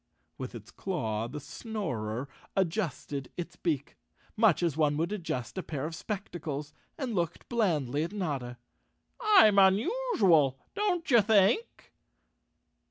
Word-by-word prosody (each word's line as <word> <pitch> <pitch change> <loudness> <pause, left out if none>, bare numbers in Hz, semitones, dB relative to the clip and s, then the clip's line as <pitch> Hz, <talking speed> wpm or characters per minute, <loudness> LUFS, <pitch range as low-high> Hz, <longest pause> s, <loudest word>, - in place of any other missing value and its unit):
With - - -6
its - - -10
claw 115 - -2
the 140 +5 -6
Snorer 130 - -4 0.3
adjusted 165 -7 -2
its 175 -1 -5
beak, 150 -6 -2 0.4
much 210 -6 +4
as 165 -5 +1
one 150 -2 +2
would 165 +5 0
adjust 170 - -3
a - - -1
pair 150 -5 -4
of 160 - -4
spectacles, 160 -6 -5 0.2
and 265 -7 -3
looked 170 -5 -2
blandly 155 - +1
at 170 - -4
Notta. 140 -12 -3 0.6
"I'm 380 - +7
unusual—don't 230 - +2
you 235 -3 +7
think?" 215 - +2
175 Hz, 120 wpm, -30 LUFS, 145-215 Hz, 0.6 s, I'm